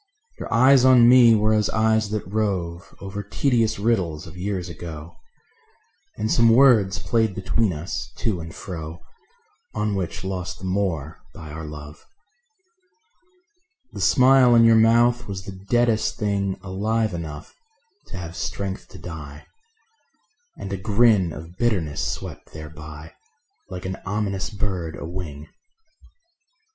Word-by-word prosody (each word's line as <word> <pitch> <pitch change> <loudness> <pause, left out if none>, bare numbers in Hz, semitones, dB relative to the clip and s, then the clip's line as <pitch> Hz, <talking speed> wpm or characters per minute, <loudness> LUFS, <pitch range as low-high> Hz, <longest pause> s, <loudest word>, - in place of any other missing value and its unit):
Your - - -7
eyes 130 +2 +5
on 125 -2 +7
me 120 -2 +7
were 110 0 +2
as 105 -1 +2
eyes 110 -1 +1
that 105 0 -3
rove 95 -4 -3
Over 100 +1 -5
tedious 115 +1 0
riddles 95 -8 -1
of 80 - -11
years 90 -1 -3
ago; 85 -2 -9 1.0
And 110 +1 -1
some 115 -1 +5
words 115 -6 +5
played 110 0 0
between 105 +2 0
us 75 -5 -5
to 105 -6 -1
and 80 0 -8
fro 80 -2 -7 0.8
On 105 -1 -1
which 95 -2 -4
lost 90 -1 -4
the 95 - -9
more 90 -6 -2 0.2
by 80 -2 -9
our 80 +1 -7
love. 75 0 -10 1.9
The - - -6
smile 130 -2 +5
on 115 - +6
your 115 0 +6
mouth 120 +2 +4
was 95 -1 -6
the 100 - -6 0.2
deadest 120 -2 +2
thing 100 -2 -1
Alive 105 +3 -1
enough 80 -4 -7 0.5
to 95 - -8
have 85 -1 -7
strength 95 0 -4
to - - -13
die; 75 -4 -9 1.1
And 100 - -6
a - - -2
grin 105 -2 +3
of 80 +3 -10
bitterness 85 -10 0
swept - - -8
thereby 75 0 -10 0.6
Like 90 -1 -7
an 95 0 -4
ominous 100 -1 -2
bird 95 -6 -3
a - - -7
wing.. 80 -4 -7
95 Hz, 135 wpm, -23 LUFS, 85-110 Hz, 1.9 s, on